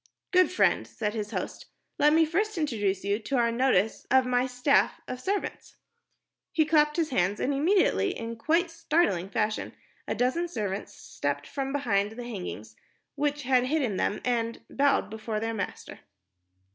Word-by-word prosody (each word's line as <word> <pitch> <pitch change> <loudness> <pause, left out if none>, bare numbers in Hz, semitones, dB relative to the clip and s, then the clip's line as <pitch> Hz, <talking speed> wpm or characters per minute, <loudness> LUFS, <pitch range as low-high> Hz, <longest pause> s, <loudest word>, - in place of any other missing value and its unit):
"Good 365 -1 +5
friend," 365 - +2
said 210 -2 -3
his 210 -2 -3
host, - - -5 0.3
"let 295 - +5
me 320 +1 +5
first 400 +6 -1
introduce 205 - 0
to 200 +2 -1
your 240 -4 +2
notice 230 -4 +1
my 250 -1 +3
staff 250 +3 +2
of 255 0 -5
servants." 395 +7 -3 0.8
He 315 - +3
clapped 300 0 +3
his 320 -3 0
hands, 195 -3 +1
and 280 - 0
immediately, 370 +5 +2
in 230 0 -5
quite 330 +9 +1
startling 305 - +1
fashion, 210 +2 -1 0.3
a - - -1
dozen 260 +8 +1
servants 205 - -4
stepped 145 0 -4
from 270 -1 -4
behind 220 -7 0
the 245 +2 -7
hangings 180 - -6 0.4
which 290 0 -1
had 255 -1 +3
hidden 255 -8 0
them 205 - -1
and 230 -2 -1
bowed 280 -6 +2
before 220 0 -3
their 225 +1 -2
master. 210 - -5
250 Hz, 155 wpm, -28 LUFS, 215-300 Hz, 0.8 s, Good